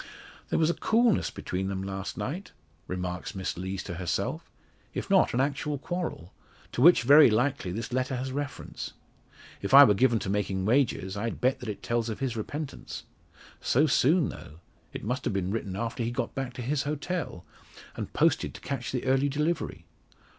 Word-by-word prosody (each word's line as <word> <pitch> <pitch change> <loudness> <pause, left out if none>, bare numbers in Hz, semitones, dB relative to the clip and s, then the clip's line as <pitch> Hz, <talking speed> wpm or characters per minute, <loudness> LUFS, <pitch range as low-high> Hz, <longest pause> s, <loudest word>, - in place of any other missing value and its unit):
"There - - +1
was 160 0 +3
a - - -2
coolness 225 +2 +2
between 95 +1 -3
them 95 -1 -3
last 95 0 -5
night," 175 +10 -4 0.3
remarks 90 +2 -4
Miss 95 -1 -3
Lees 95 +2 -4
to 90 - -6
herself, 90 -4 -2 0.5
"if - - -4
not - - +5
an - - +1
actual 145 +2 0
quarrel; 160 - -4 0.4
to - - -2
which, 170 -2 +7
very 145 +2 +8
likely, 120 -3 0
this 115 +5 -4
letter 130 +1 0
has 130 +1 -3
reference. 145 +1 -5 0.7
If 100 +7 +3
I 140 - +12
were 105 - +6
given 120 +3 +3
to 105 - -4
making 95 -1 -1
wagers, 110 -5 +1
I'd 115 +3 -3
bet 130 +1 +2
that 120 - -6
it 105 - -6
tells 120 -1 0
of 110 - -4
his 130 -4 -2
repentance. 145 +6 -5 0.6
So 145 +5 +3
soon, 155 +3 +3
though! 75 +3 -10 0.3
It - - -7
must 125 +4 -2
have - - -1
been 95 -1 -1
written 100 -3 -3
after 115 +3 -3
he 115 - 0
got 120 - -3
back 135 -2 -4
to 125 - -6
his 140 +3 0
hotel, 150 - -3 0.5
and - - -5
posted - - +2
to - - -10
catch 130 -3 -4
the 125 -1 -2
early 135 +2 +3
delivery. 150 - -2
125 Hz, 185 wpm, -28 LUFS, 100-140 Hz, 0.7 s, I